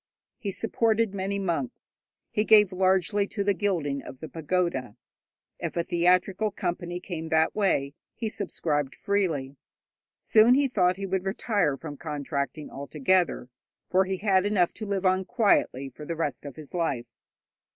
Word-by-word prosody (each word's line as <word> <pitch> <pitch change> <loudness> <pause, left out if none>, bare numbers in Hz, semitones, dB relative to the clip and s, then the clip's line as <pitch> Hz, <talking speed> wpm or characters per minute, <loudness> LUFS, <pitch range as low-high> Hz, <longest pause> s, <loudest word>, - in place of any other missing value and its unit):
He 205 - -3
supported 225 +1 +1
many 200 +1 -2
monks, 195 +6 -3 0.3
he 210 - +1
gave 210 -3 +6
largely 190 +2 +2
to 200 -1 -2
the 200 0 +2
gilding 165 -8 -1
of 130 - -10
the 160 - -7
pagoda. 160 - -1 0.6
If - - -4
a 170 - +2
theatrical 180 +5 +2
company 175 -3 -3
came 165 -3 -6
that 160 0 +3
way, 145 -9 +1 0.2
he 225 - -3
subscribed 150 -9 -2
freely. 160 -10 -1 0.6
Soon 225 +3 +5
he 280 0 +3
thought 185 -7 +2
he 195 - -4
would 190 -1 -1
retire 195 - 0
from 150 -2 -8
contracting 145 -1 -3
altogether, 145 +1 0 0.4
for 190 +1 +2
he 190 0 -2
had 190 -1 +3
enough 200 -4 +2
to 215 - -7
live 195 -1 -1
on 185 +1 +3
quietly 195 - +1
for 150 - -9
the 165 +3 -4
rest 150 -2 -3
of 140 - -8
his 155 -2 -11
life. 160 -9 -1
185 Hz, 155 wpm, -27 LUFS, 155-200 Hz, 0.6 s, gave